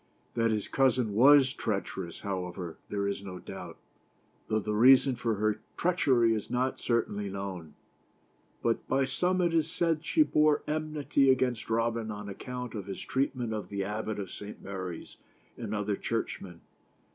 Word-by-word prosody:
That 115 Hz, -1 st, +2 dB
his 105 Hz, -2 st, -1 dB
cousin 130 Hz, -5 st, +2 dB
was 130 Hz, +3 st, +6 dB
treacherous, 95 Hz, -5 st, -3 dB
however, 90 Hz, -3 st, -4 dB
there 100 Hz, -1 st, -1 dB
is 100 Hz, 0 st, -2 dB
no 95 Hz, -2 st, -7 dB
doubt, -, -, -8 dB, 0.7 s
though 110 Hz, -, +1 dB
the 105 Hz, 0 st, -2 dB
rea 125 Hz, +5 st, +8 dB
son 130 Hz, 0 st, 0 dB
for 115 Hz, -2 st, -1 dB
her 105 Hz, +1 st, 0 dB, 0.2 s
treachery 130 Hz, -10 st, +3 dB
is 110 Hz, -2 st, -3 dB
not 125 Hz, +2 st, 0 dB
certainly 105 Hz, -4 st, 0 dB
known. 95 Hz, -6 st, -6 dB, 1.1 s
By 135 Hz, +1 st, +2 dB
some 180 Hz, +7 st, +1 dB
it 170 Hz, -1 st, +2 dB
is 165 Hz, -1 st, +2 dB
said 165 Hz, -2 st, +1 dB
that 155 Hz, -, -19 dB
she 315 Hz, -, +5 dB
bore 150 Hz, -, +3 dB
enmity 150 Hz, -3 st, +1 dB
against 125 Hz, -4 st, +1 dB
Robin 115 Hz, 0 st, 0 dB
on 105 Hz, -1 st, -6 dB
account 125 Hz, +4 st, -6 dB
of 100 Hz, -4 st, -5 dB
his 95 Hz, -, -5 dB
treatment 130 Hz, -4 st, -1 dB
of 105 Hz, -1 st, -4 dB
the 100 Hz, -1 st, -2 dB
Abbot 105 Hz, +2 st, -3 dB
of 100 Hz, -3 st, -5 dB
St. 105 Hz, 0 st, -8 dB
Mary's 95 Hz, -3 st, -6 dB, 0.4 s
and 110 Hz, -3 st, -4 dB
other 105 Hz, -1 st, 0 dB
church 115 Hz, +3 st, -3 dB
men. 85 Hz, -3 st, -11 dB
115 Hz, 165 wpm, -30 LUFS, 100-130 Hz, 1.1 s, rea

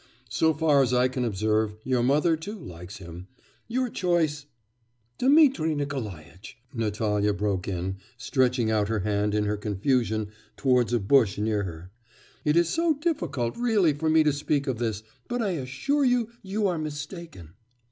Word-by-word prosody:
So 160 Hz, +5 st, +2 dB
far 150 Hz, -2 st, +4 dB
as 125 Hz, -1 st, +2 dB
I 125 Hz, +1 st, +4 dB
can 130 Hz, 0 st, -2 dB
observe, 110 Hz, -1 st, 0 dB
your 130 Hz, -1 st, +1 dB
mother, 150 Hz, +6 st, +3 dB
too, 200 Hz, +8 st, -7 dB
likes 90 Hz, -, -9 dB
him.... 90 Hz, -1 st, -10 dB, 0.4 s
Your 255 Hz, +3 st, 0 dB
choice 165 Hz, -, 0 dB, 0.3 s
' 120 Hz, 0 st, -44 dB
'Dmitri 265 Hz, -, +4 dB
Nikolaitch,' 105 Hz, -, -6 dB, 0.2 s
Natalya 105 Hz, -2 st, 0 dB
broke 95 Hz, -1 st, -1 dB
in, 95 Hz, 0 st, -3 dB, 0.2 s
stretching 125 Hz, -3 st, +1 dB
out 105 Hz, -2 st, +1 dB
her 110 Hz, -2 st, -1 dB
hand 105 Hz, +1 st, 0 dB
in 105 Hz, -, +2 dB
her 105 Hz, 0 st, -1 dB
confusion 110 Hz, +1 st, 0 dB, 0.3 s
towards 125 Hz, -3 st, +2 dB
a 120 Hz, -, +2 dB
bush 110 Hz, 0 st, +3 dB
near 105 Hz, -1 st, 0 dB
her, 85 Hz, +1 st, -8 dB, 0.5 s
'it 150 Hz, +2 st, +2 dB
is 170 Hz, -1 st, +4 dB
so 330 Hz, -, +1 dB
difficult, 285 Hz, -, -2 dB
really, 215 Hz, -10 st, +2 dB
for 155 Hz, +2 st, -1 dB
me 160 Hz, 0 st, +5 dB
to 150 Hz, -1 st, +2 dB
speak 145 Hz, 0 st, 0 dB
of 130 Hz, -5 st, -2 dB
this; 110 Hz, -3 st, -2 dB, 0.2 s
but 245 Hz, -, -2 dB
I 210 Hz, -4 st, 0 dB
assure 165 Hz, -, -1 dB
you... 245 Hz, -3 st, +2 dB
you 200 Hz, +2 st, -2 dB
are 180 Hz, -4 st, 0 dB
mistaken. 150 Hz, -, -7 dB
125 Hz, 165 wpm, -26 LUFS, 105-160 Hz, 0.5 s, me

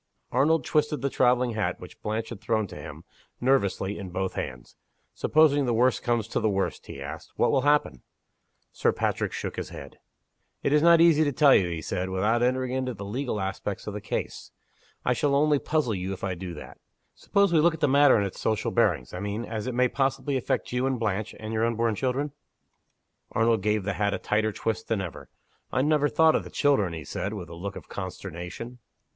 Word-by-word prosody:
Arnold 140 Hz, +2 st, +2 dB
twisted 150 Hz, -1 st, 0 dB
the 140 Hz, -, 0 dB
traveling 125 Hz, -1 st, +3 dB
hat 105 Hz, -5 st, -2 dB
which -, -, -12 dB
Blanche 110 Hz, +1 st, -3 dB
had 115 Hz, -5 st, -8 dB
thrown 110 Hz, -2 st, 0 dB
to -, -, -10 dB
him, -, -, -9 dB, 0.4 s
nervously, 105 Hz, -6 st, +1 dB
in 95 Hz, -2 st, -6 dB
both 95 Hz, +1 st, -2 dB
hands. 65 Hz, -2 st, -6 dB, 0.4 s
"Supposing 145 Hz, -3 st, +3 dB
the 120 Hz, -, +1 dB
worst 125 Hz, +2 st, +3 dB
comes 120 Hz, -2 st, 0 dB
to -, -, 0 dB
the 110 Hz, -, +1 dB
worst," 100 Hz, -1 st, -2 dB
he -, -, -8 dB
asked, 70 Hz, +1 st, -8 dB
"what -, -, +2 dB
will -, -, +3 dB
happen?" 145 Hz, -, +2 dB, 0.7 s
Sir -, -, +1 dB
Patrick -, -, -1 dB
shook -, -, -5 dB
his -, -, -4 dB
head. -, -, -10 dB, 0.6 s
"It 140 Hz, -, +2 dB
is 150 Hz, -, +5 dB
not 170 Hz, 0 st, +6 dB
easy 165 Hz, -2 st, +6 dB
to 145 Hz, -, +1 dB
tell 140 Hz, 0 st, +5 dB
you," 95 Hz, -, +4 dB
he 85 Hz, -2 st, -4 dB
said, 90 Hz, +4 st, -2 dB
"without 105 Hz, +6 st, +1 dB
entering 130 Hz, +1 st, +1 dB
into 130 Hz, -1 st, -2 dB
the 100 Hz, -, -7 dB
legal 120 Hz, +2 st, -3 dB
aspect 95 Hz, +1 st, -4 dB
of 105 Hz, -, -5 dB
the 105 Hz, -, -5 dB
case. -, -, -4 dB, 0.6 s
I 125 Hz, -, +3 dB
shall 140 Hz, +2 st, +1 dB
only 150 Hz, 0 st, +3 dB
puzzle 150 Hz, -7 st, 0 dB
you 95 Hz, 0 st, -3 dB
if 95 Hz, -, -10 dB
I 95 Hz, -1 st, -1 dB
do 90 Hz, -1 st, -6 dB
that. -, -, -11 dB, 0.3 s
Suppose 200 Hz, -3 st, +1 dB
we 160 Hz, -, +5 dB
look 165 Hz, +1 st, +4 dB
at -, -, -11 dB
the 150 Hz, -, +3 dB
matter 140 Hz, -1 st, +6 dB
in 100 Hz, -, +1 dB
its 95 Hz, -, -6 dB
social 110 Hz, -1 st, 0 dB
bearings 85 Hz, -, +1 dB
I 90 Hz, -, -4 dB
mean, 105 Hz, +4 st, -3 dB
as 110 Hz, 0 st, -4 dB
it 125 Hz, -, -3 dB
may 125 Hz, +1 st, +4 dB
possibly 135 Hz, +2 st, -1 dB
affect 130 Hz, 0 st, -1 dB
you 125 Hz, +2 st, 0 dB
and 130 Hz, -2 st, -1 dB
Blanche, 110 Hz, -1 st, -2 dB
and 110 Hz, 0 st, -5 dB
your 110 Hz, 0 st, +1 dB
unborn 115 Hz, -1 st, +1 dB
children?" 135 Hz, +5 st, -1 dB, 1.0 s
Arnold 115 Hz, -2 st, +2 dB
gave 105 Hz, 0 st, +1 dB
the 100 Hz, +1 st, -1 dB
hat 100 Hz, 0 st, 0 dB
a -, -, -2 dB
tighter 110 Hz, +1 st, 0 dB
twist 110 Hz, +1 st, -3 dB
than 115 Hz, -, 0 dB
ever. 90 Hz, -3 st, -7 dB, 0.4 s
"I 130 Hz, -, +1 dB
never 150 Hz, -1 st, +3 dB
thought 160 Hz, -1 st, +4 dB
of -, -, +1 dB
the -, -, -9 dB
children," 135 Hz, -, +2 dB
he 80 Hz, -2 st, -6 dB
said, 100 Hz, +9 st, -4 dB
with 90 Hz, -5 st, -7 dB
a -, -, -9 dB
look 100 Hz, +4 st, -6 dB
of -, -, -9 dB
consternation. 95 Hz, +5 st, -7 dB
115 Hz, 215 wpm, -27 LUFS, 100-135 Hz, 1.0 s, not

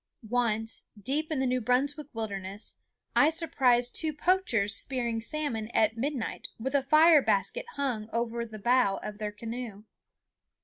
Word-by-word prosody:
Once, 225 Hz, -2 st, 0 dB
deep 290 Hz, +9 st, -1 dB
in 300 Hz, -, 0 dB
the 265 Hz, -, +1 dB
New 255 Hz, 0 st, 0 dB
Brunswick 275 Hz, +6 st, 0 dB
wilderness, 200 Hz, -2 st, -5 dB, 0.4 s
I 290 Hz, -, +6 dB
surprised 255 Hz, -7 st, +2 dB
two 315 Hz, -2 st, +1 dB
poachers 295 Hz, -, +1 dB
spearing 235 Hz, -4 st, +1 dB
salmon 235 Hz, -4 st, -2 dB
at 220 Hz, 0 st, +3 dB
midnight 260 Hz, 0 st, -3 dB
with 260 Hz, +4 st, -3 dB
a 280 Hz, -, +3 dB
fire 310 Hz, +3 st, +6 dB
basket 195 Hz, -, 0 dB
hung 240 Hz, -6 st, -2 dB
over 235 Hz, 0 st, -2 dB
the 220 Hz, -2 st, -9 dB
bow 240 Hz, -2 st, +2 dB
of 210 Hz, 0 st, -7 dB
their 210 Hz, -1 st, -3 dB
canoe. 225 Hz, -1 st, -7 dB
240 Hz, 145 wpm, -29 LUFS, 220-280 Hz, 0.4 s, I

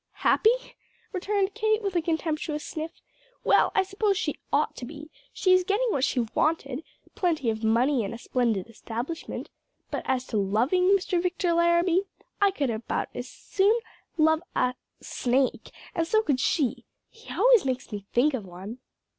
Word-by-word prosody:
"Happy?" 440 Hz, -, +5 dB, 0.6 s
returned 390 Hz, +1 st, 0 dB
Kate, 435 Hz, 0 st, +1 dB
with 395 Hz, -2 st, -2 dB
a 345 Hz, -, +3 dB
contemptuous 315 Hz, -2 st, -2 dB
sniff. 315 Hz, +1 st, -6 dB, 0.4 s
"Well, -, -, +4 dB
I 390 Hz, -, +4 dB
suppose 390 Hz, +1 st, 0 dB
she 300 Hz, -5 st, -2 dB
ought 290 Hz, +2 st, +1 dB
to 245 Hz, -, -5 dB
be; 300 Hz, +3 st, -10 dB, 0.2 s
she 370 Hz, -1 st, +3 dB
is 370 Hz, 0 st, +5 dB
getting 410 Hz, +6 st, +1 dB
what 270 Hz, -, 0 dB
she 255 Hz, -, +2 dB
wanted 305 Hz, -3 st, 0 dB, 0.3 s
plenty 315 Hz, -10 st, +1 dB
of 220 Hz, 0 st, -5 dB
money 235 Hz, +3 st, +3 dB
and 200 Hz, -, -4 dB
a 230 Hz, -, -6 dB
splendid 235 Hz, -5 st, 0 dB
establishment; 235 Hz, +7 st, -6 dB, 0.4 s
but -, -, -2 dB
as 260 Hz, -1 st, 0 dB
to -, -, +2 dB
loving 230 Hz, -, +2 dB
Mr. 375 Hz, -2 st, +3 dB
Victor 355 Hz, -1 st, 0 dB
Larrabee 340 Hz, +2 st, +3 dB, 0.4 s
I 400 Hz, -, +6 dB
could 285 Hz, -10 st, -1 dB
about 220 Hz, 0 st, -3 dB
as 245 Hz, +1 st, -6 dB
soon 410 Hz, +4 st, +1 dB, 0.4 s
love 315 Hz, 0 st, +4 dB
a 250 Hz, 0 st, +2 dB, 0.3 s
snake; 250 Hz, -1 st, 0 dB, 0.2 s
and 330 Hz, 0 st, 0 dB
so 435 Hz, +4 st, +3 dB
could 280 Hz, -10 st, +1 dB
she. 270 Hz, -2 st, +1 dB, 0.3 s
He 455 Hz, -, -13 dB
always -, -, +5 dB
makes 260 Hz, -2 st, -3 dB
me 200 Hz, -2 st, -6 dB
think 275 Hz, +5 st, +3 dB
of 250 Hz, -5 st, -2 dB
one." 190 Hz, +6 st, -9 dB
310 Hz, 165 wpm, -27 LUFS, 245-370 Hz, 0.6 s, I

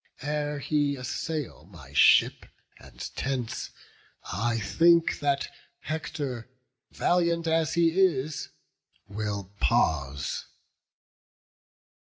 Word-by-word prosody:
Ere 150 Hz, 0 st, -2 dB
he 145 Hz, 0 st, 0 dB
assail 135 Hz, -, -4 dB
my 75 Hz, -8 st, -14 dB
ship -, -, +5 dB, 0.3 s
and -, -, -16 dB, 0.2 s
tents, 130 Hz, -4 st, -3 dB, 0.6 s
I 115 Hz, +1 st, 0 dB
think 170 Hz, +9 st, +3 dB
That 140 Hz, -1 st, 0 dB, 0.3 s
Hector, 145 Hz, -6 st, -4 dB, 0.4 s
valiant 170 Hz, -1 st, +1 dB
as 160 Hz, -1 st, +1 dB
he 170 Hz, -1 st, +4 dB
is, 155 Hz, -7 st, +1 dB, 0.6 s
will 100 Hz, -1 st, -4 dB
pause." 70 Hz, 0 st, 0 dB
140 Hz, 85 wpm, -27 LUFS, 105-160 Hz, 0.6 s, ship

